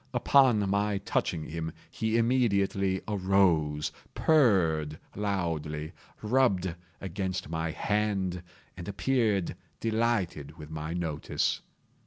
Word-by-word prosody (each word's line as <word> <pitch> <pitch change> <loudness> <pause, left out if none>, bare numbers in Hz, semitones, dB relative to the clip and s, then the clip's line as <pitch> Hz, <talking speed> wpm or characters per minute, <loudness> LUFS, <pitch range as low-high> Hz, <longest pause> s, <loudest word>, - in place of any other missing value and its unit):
Upon 125 -7 +4
my 100 +1 +1
touching 85 -4 -1
him, 80 0 -4 0.2
he 110 0 0
immediately 100 -6 +2
arose, 90 -7 +2 0.2
purred 85 - +3 0.2
loudly, 80 -7 -2 0.3
rubbed 105 -7 +2 0.3
against 95 -3 -3
my 80 0 -2
hand, 95 0 -1 0.3
and 85 -1 -8
appeared 100 -1 +1 0.2
delighted 110 -10 -1
with 75 -1 -10
my 80 +1 -4
notice. 80 -4 -1
95 Hz, 95 wpm, -29 LUFS, 80-105 Hz, 0.3 s, Upon